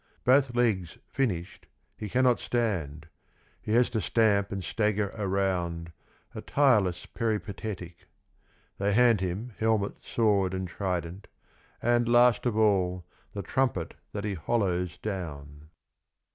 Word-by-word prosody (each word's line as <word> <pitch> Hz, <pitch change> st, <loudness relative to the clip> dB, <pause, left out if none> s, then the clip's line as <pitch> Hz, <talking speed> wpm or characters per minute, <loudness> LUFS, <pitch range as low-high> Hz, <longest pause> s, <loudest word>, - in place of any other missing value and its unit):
Both 130 Hz, -1 st, +4 dB
legs 105 Hz, -8 st, 0 dB
finished 95 Hz, -11 st, -3 dB, 0.3 s
he 105 Hz, -, -6 dB
cannot 125 Hz, +2 st, +3 dB
stand, 85 Hz, -11 st, -2 dB, 0.5 s
he 105 Hz, -, -3 dB
has 120 Hz, +1 st, +5 dB
to 110 Hz, -2 st, -1 dB
stamp 100 Hz, -1 st, +2 dB
and 95 Hz, -2 st, -4 dB
stagger 105 Hz, -1 st, 0 dB
around, 95 Hz, -5 st, -1 dB, 0.4 s
a -, -, -6 dB
tireless 105 Hz, -11 st, +2 dB
peripatetic. 105 Hz, -5 st, -4 dB, 0.7 s
They 100 Hz, +1 st, +1 dB
hand 115 Hz, -2 st, +4 dB
him 95 Hz, +6 st, -3 dB
helmet, 110 Hz, -2 st, 0 dB
sword 100 Hz, -5 st, +1 dB
and 95 Hz, 0 st, -3 dB
trident, 90 Hz, 0 st, -4 dB, 0.6 s
and, 120 Hz, 0 st, +2 dB
last 120 Hz, 0 st, +4 dB
of 110 Hz, -3 st, -1 dB
all, 90 Hz, -5 st, +2 dB, 0.3 s
the 100 Hz, -, -4 dB
trumpet 120 Hz, -7 st, -1 dB, 0.2 s
that 105 Hz, -, -4 dB
he 105 Hz, -1 st, -2 dB
holloes 90 Hz, -1 st, -1 dB
down. 75 Hz, -7 st, -6 dB
100 Hz, 120 wpm, -28 LUFS, 90-115 Hz, 0.7 s, has